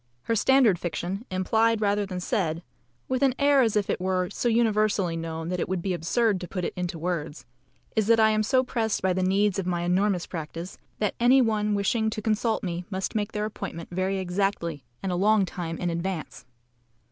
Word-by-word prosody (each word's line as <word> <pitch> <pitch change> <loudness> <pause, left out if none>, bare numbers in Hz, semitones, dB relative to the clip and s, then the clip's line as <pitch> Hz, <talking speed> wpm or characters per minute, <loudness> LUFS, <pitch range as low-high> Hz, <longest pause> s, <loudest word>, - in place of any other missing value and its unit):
Her 230 - 0
standard 230 -5 +4
fiction, 180 +5 -4
implied 220 +5 +2
rather 205 -1 +1
than 185 -1 -4
said 175 -5 -1 0.4
(with 255 -1 -1
an 265 -2 +3
air 285 -1 +4
as 225 -4 +2
if 205 -2 +1
it - - -2
were 185 0 0
so 240 - 0
universally 215 -6 +2
known 165 0 -4
that 180 0 -2
it - - -2
would 185 -2 -2
be 190 - 0
absurd 190 +4 +1
to 180 - -5
put 180 -1 -3
it - - -3
into 180 -1 -3
words) 160 -5 -4 0.5
is, 215 -2 +2
that 230 0 +5
I 220 0 +5
am 215 0 +2
so 255 +4 +2
pressed 225 -5 -1
by 190 -1 +2
the 185 - -1
needs 195 +1 +2
of 185 - -3
my 175 -1 0
enormous 180 +1 +1
practice, 165 +2 -7 0.2
that 210 -2 0
any 250 +3 +6
one 210 -3 +1
wishing 220 +2 +1
to 215 - -4
consult 220 +1 0
me 175 -1 -3
must 190 -1 -3
make 210 0 -1
their 210 0 -1
appointment 170 -5 -6
very 185 +2 -1
exactly 180 -5 -1 0.2
and 190 - -1
a - - 0
long 205 +2 +3
time 170 -3 -5
in 175 -1 -1
advance. 170 -4 -4
195 Hz, 205 wpm, -26 LUFS, 180-220 Hz, 0.5 s, any